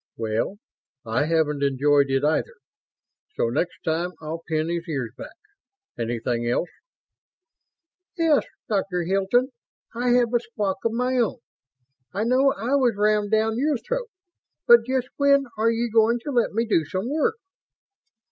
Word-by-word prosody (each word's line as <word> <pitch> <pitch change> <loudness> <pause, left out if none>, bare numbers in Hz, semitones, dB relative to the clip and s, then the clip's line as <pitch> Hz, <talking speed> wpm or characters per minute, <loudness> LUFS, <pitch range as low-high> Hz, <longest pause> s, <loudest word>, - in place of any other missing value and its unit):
"Well, 115 - -2 0.5
I 115 +5 0
haven't 155 -3 +1
enjoyed 140 +1 +3
it, 135 +1 +1
either. 160 - 0 0.8
So 115 - 0
next 150 +8 -2
time 170 +2 -1
I'll 160 +1 -6
pin 155 0 0
his 170 0 -3
ears 130 -7 -3
back. 310 +2 -10 0.6
Anything 120 0 -2
else?" 125 +8 0 1.5
"Yes, 325 -4 +3 0.2
Dr. 195 -5 -1
Hilton, 195 +8 +1 0.4
I 245 +2 -1
have 245 -1 +2
a 240 - +4
squawk 205 -5 -3
of 230 - +1
my 250 +2 0
own. 240 +1 +1 0.8
I 205 - 0
know 260 +4 +3
I 235 +5 -3
was 245 -5 +2
rammed 210 0 +2
down 220 +1 +1
your 290 0 +1
throat, - - -4 0.6
but 235 -1 +7
just 260 -1 0
when 280 -1 +4
are 225 +1 +2
you 230 +1 0
going 225 +1 +4
to 290 - -4
let 240 -3 +1
me 230 +3 0
do 205 -7 +2
some 185 +8 -4
work?" 310 - 0
210 Hz, 150 wpm, -24 LUFS, 155-245 Hz, 1.5 s, but